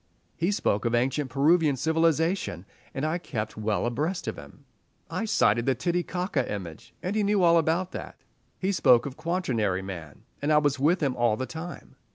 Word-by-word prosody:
He 170 - 0
spoke 110 - 0
of 115 0 +2
ancient 130 +3 0
Peruvian 150 +3 +3
civilization, 160 - +1 0.3
and 135 +2 -3
I 160 +3 0
kept 110 -9 -4
well 110 0 -1
abreast 150 +10 -2
of - - -2
him. - - -13 0.5
I - - -2
cited 130 - +2
the 135 - +3
Titicaca 180 +1 -1
image, 90 -6 -7
and 185 +3 -2
he 215 - +2
knew 205 -2 +2
all 170 -1 +6
about 165 +4 0
that. - - -7 0.4
He 190 +1 0
spoke 125 -10 +4
of 135 -2 -5
Quaternary 130 - -1
man, 85 -6 -8 0.2
and 145 +2 0
I 150 - +6
was 145 -3 +2
with 160 +5 +2
him 135 -3 +1
all 120 -3 +2
the 130 - -2
time. 160 +1 -8
150 Hz, 185 wpm, -27 LUFS, 120-175 Hz, 0.5 s, all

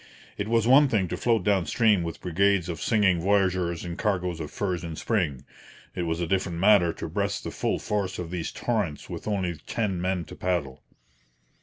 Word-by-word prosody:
It 100 - -3
was 115 -1 +2
one 140 +3 +7
thing 105 -8 +1
to - - -2
float 115 -5 +1
down 95 -5 +2
stream 105 +3 +3
with 85 -1 -5
brigades 95 +1 +1
of 85 - -5
singing 100 -6 +2
voyageurs 95 -3 +1
and 85 -1 -6
cargoes 90 -5 -1
of 75 -2 -5
furs 90 -4 -2
in 85 -1 -5
spring; 80 - -1 0.5
it 85 - -3
was 80 +1 -1
a 85 - 0
different 90 -1 -1
matter 95 -2 +5
to - - -6
breast - - -2
the - - -5
full - - -1
force 100 -3 -2
of 85 -2 -5
these 85 -3 -3
torrents 105 -11 -2
with - - -6
only 95 -5 -1
ten 100 -6 -1
men 90 -2 -1
to - - -10
paddle. 85 -8 -2
90 Hz, 195 wpm, -26 LUFS, 85-105 Hz, 0.5 s, one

